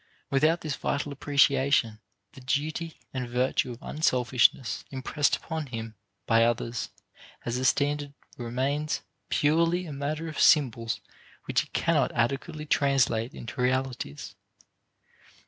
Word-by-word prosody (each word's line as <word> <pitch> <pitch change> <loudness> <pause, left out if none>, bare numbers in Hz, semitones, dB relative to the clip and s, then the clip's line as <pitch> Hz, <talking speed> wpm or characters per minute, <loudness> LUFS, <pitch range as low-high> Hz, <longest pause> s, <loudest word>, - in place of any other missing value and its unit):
Without 155 +5 +3
this 155 -3 -3
vital 145 0 -2
appreciation, 140 -5 +2 0.3
the 135 - -12
duty 155 +5 -2 0.2
and 125 -2 -3
virtue 125 +1 +1
of 120 - -7
unselfishness 125 -5 +2
impressed 140 +2 +1
upon 160 -2 -5
him 115 -3 -6 0.3
by 115 0 +4
others 120 0 -1 0.6
as 120 +1 -1
a 130 - -1
standard 145 +3 +1 0.2
remains 135 +6 -1 0.3
purely 165 +4 +2
a 155 - -6
matter 150 +3 -3
of 155 - -5
symbols 115 -6 +3 0.4
which - - +2
he - - -9
cannot 150 -6 +1
adequately 140 +6 -1
translate 135 -5 +2
into 120 +2 -6
realities. 125 - -2
135 Hz, 120 wpm, -28 LUFS, 120-150 Hz, 0.6 s, by